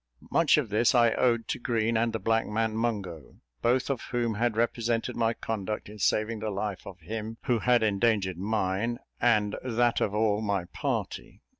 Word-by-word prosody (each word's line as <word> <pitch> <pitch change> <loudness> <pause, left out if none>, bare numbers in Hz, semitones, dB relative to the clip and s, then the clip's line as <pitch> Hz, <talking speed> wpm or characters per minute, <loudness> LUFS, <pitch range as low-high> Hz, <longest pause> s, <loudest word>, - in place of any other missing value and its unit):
Much 165 -3 +4
of 140 -7 0
this 115 +5 +3
I 120 -1 +5
owed 115 -2 +1
to - - -2
Green, 115 -1 0
and 115 +1 +2
the 110 - -2
black 115 0 +1
man 110 +1 -1
Mungo, 100 - -3 0.3
both 125 +2 +2
of 135 -4 -2
whom 120 -2 0
had 115 +1 0
represented 115 0 0
my 115 -1 +1
conduct 105 -1 -4
in 105 0 -11
saving 110 +3 +1
the 110 +1 -3
life 100 -2 -4
of 95 -2 -10
him 110 +5 -5
who 125 -4 +1
had 120 0 +3
endangered 100 -3 +1
mine 105 +3 -1 0.2
and 105 -4 +2
that 120 -1 +1
of 105 - 0
all 105 -1 +2
my 100 -4 -1
party. - - -4
110 Hz, 180 wpm, -28 LUFS, 105-120 Hz, 0.3 s, I